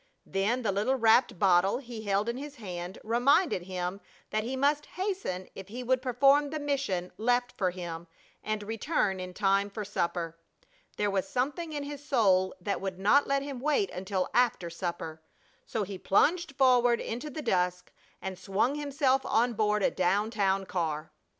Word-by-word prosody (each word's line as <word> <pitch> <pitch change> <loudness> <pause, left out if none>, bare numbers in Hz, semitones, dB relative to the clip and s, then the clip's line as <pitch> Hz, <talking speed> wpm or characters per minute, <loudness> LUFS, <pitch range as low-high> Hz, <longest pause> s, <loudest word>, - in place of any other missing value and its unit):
Then 215 +6 0
the 210 - +1
little 210 +7 +1
wrapped 230 -3 +4
bottle 190 +2 +4
he 240 -4 -8
held 200 +2 +1
in 235 - -1
his 290 +1 -7
hand 180 -5 -6
reminded 245 - +3
him 180 +1 -4 0.3
that 215 0 0
he 250 +4 -3
must 290 +2 +1
hasten 370 - -3
if 195 - -9
he 240 +5 -6
would 255 +1 +1
perform 275 +3 +4
the 310 +1 -3
mission 270 -12 -1
left 245 +2 +1
for 185 -3 +1
him 175 -2 -6 0.4
and 215 -1 -2
return 215 - -1
in 185 0 -7
time 200 0 +2
for 210 +1 -5
supper. 170 -4 -2 0.6
There 205 -1 +1
was 195 -1 0
something 295 +6 -2
in 290 -2 -3
his 285 0 -7
soul 195 -9 +3
that 200 +2 -2
would 190 -2 -4
not 210 +10 +4
let 275 0 +1
him 280 -3 -5
wait 305 - +1
until 185 0 -2
after 230 -8 +2
supper. 170 -2 -5 0.5
So 220 - -1
he 195 -1 -6
plunged 320 - +2
forward 245 -3 +4
into 245 +7 -4
the 305 +1 -6
dusk 180 -3 0 0.3
and 190 -1 -5
swung 195 +8 +1
himself 280 -2 +1
on 235 +2 +2
board 210 -1 +1
a - - +3
down 200 +4 +1
town 195 -3 +1
car. 165 -4 -2
215 Hz, 175 wpm, -29 LUFS, 190-265 Hz, 0.6 s, wrapped